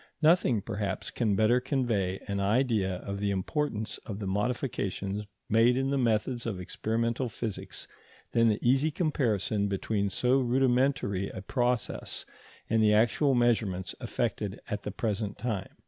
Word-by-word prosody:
Nothing, 150 - +4
perhaps, 100 -3 -3
can 110 -5 +1
better 110 +4 +4
convey 120 -8 0
an 100 0 -1
idea 105 -2 +2
of 100 0 -4
the 100 0 0
importance 110 - -2
of 100 -4 -7
the 105 - -5
modifications 105 -1 -2 0.2
made 115 +3 +4
in 135 +1 0
the 140 - +1
methods 120 0 0
of 100 -5 -3
experimental 115 +6 -1
physics 110 -2 -6 0.4
than 115 0 +4
the 105 -2 +3
easy 135 +5 +4
comparison 110 - 0
between 100 +1 -1
so 125 +7 +2
rudimentary 125 -6 +1
a 95 - -7
process 120 +1 -1 0.4
and 110 0 +2
the 105 -1 +5
actual 125 +5 +3
measurements 110 -7 +1
effected - - -2
at - - -3
the - - -4
present 105 -2 -2
time. 105 -5 -3
110 Hz, 145 wpm, -29 LUFS, 100-125 Hz, 0.4 s, the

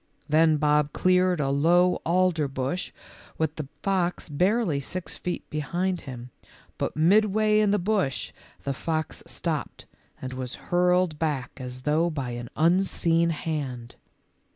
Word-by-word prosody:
Then 155 0 +4
Bob 150 0 +2
cleared 185 -1 +3
a 135 -2 +1
low 175 +6 +3
alder 175 -3 +2
bush 135 +6 -3 0.5
with 160 -1 -1
the 150 -3 -5 0.2
fox 180 -4 0
barely 180 +1 +1
six 175 +6 -5
feet 180 - -4
behind 175 +5 -1
him, 125 -1 -8 0.5
but - - -2
midway 210 +5 +4
in 210 -1 +3
the 205 - +3
bush 190 - -1 0.3
the 140 - -1
fox 155 +2 -3
stopped - - -4 0.3
and 130 0 -6
was 130 -1 -5
hurled 180 -2 +1
back 145 -6 -1
as 125 -1 -7
though 155 +4 +2
by 140 -6 -4
an 120 0 -6
unseen 170 0 +2
hand. 140 -7 -4
160 Hz, 135 wpm, -26 LUFS, 140-180 Hz, 0.5 s, Then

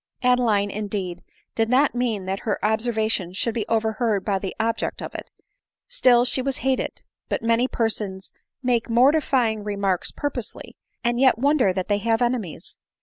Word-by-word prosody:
Adeline, 230 -5 +3
in, 210 +1 -4
deed, 185 -4 -4 0.3
did 225 0 0
not 270 +4 +3
mean 235 -6 -1
that 190 +1 -2
her 215 - -1
observation 220 -4 0
should 225 +4 -1
be 220 -3 -3
over 220 -1 +1
heard 215 -3 -1
by 195 -2 0
the 190 -1 -5
object 225 0 -1
of - - -6
it - - -7 0.3
— - - -65
still 250 - +4
she 260 - +3
was 270 0 -1
hated; 265 -1 -1 0.3
but - - -2
many 230 +2 +2
persons 210 -6 -2 0.3
make 240 -2 +1
mortifying. 245 -3 +3
remarks 200 -3 0
purposely, 270 -6 -5 0.3
and 240 0 +1
yet 260 -3 +5
won 285 +5 +3
der 225 -9 +3
that 185 0 -3
they 205 -1 +1
have 225 +1 +1
enemies 240 -8 -3
225 Hz, 175 wpm, -23 LUFS, 205-245 Hz, 0.3 s, yet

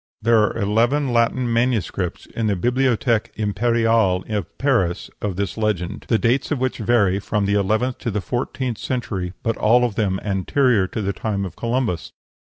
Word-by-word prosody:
There 115 0 +4
are 105 - 0
eleven 120 +6 +1
Latin 120 +2 +2
MSS. 115 -7 -1
in 115 -1 0
the 100 - +1
Bibliothèque 120 +1 +1
Impériale 110 -2 +1
at 105 -4 -3
Paris 120 -11 0
of 100 -3 -2
this 100 +1 -3
legend, 105 -3 -2
the 115 - +3
dates 125 +4 +1
of 145 - 0
which 130 0 -2
vary 105 -4 +2
from 105 0 -1
the 100 - +1
eleventh 110 +5 +1
to - - -3
the 105 -1 -1
fourteenth 125 +2 -3
century, 95 -8 -3
but 115 -1 -1
all 120 +3 +4
of 120 - -2
them 95 -3 0
anterior 105 +2 +2
to 105 +4 -4
the 100 0 -1
time 100 0 -2
of 90 -2 -8
Columbus. 115 -8 -2
110 Hz, 175 wpm, -21 LUFS, 100-120 Hz, -, There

